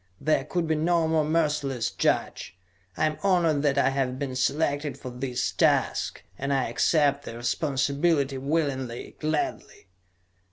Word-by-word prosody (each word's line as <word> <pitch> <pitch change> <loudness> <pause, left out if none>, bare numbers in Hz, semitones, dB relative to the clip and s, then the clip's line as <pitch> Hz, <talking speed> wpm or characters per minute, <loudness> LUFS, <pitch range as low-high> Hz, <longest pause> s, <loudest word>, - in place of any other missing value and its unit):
There 155 +2 +1
could 175 -2 -1
be 160 - +1
no 165 +1 +2
more 160 -1 +2
merciless 150 -6 0
judge. 90 - -1 0.4
I - - +2
am 155 -1 -2
honored 170 -6 +2
that 140 -2 +1
I - - +4
have 130 -2 -1
been 135 -2 -4
selected 145 +2 0
for 125 - -8
this 125 0 -2
task, - - +1 0.2
and 140 +1 -2
I 135 -4 +1
accept 140 +2 +2
the 115 - -7
responsibility 140 +3 0
willingly, 135 -4 -2
gladly. 155 -9 -3
145 Hz, 145 wpm, -26 LUFS, 130-155 Hz, 0.4 s, I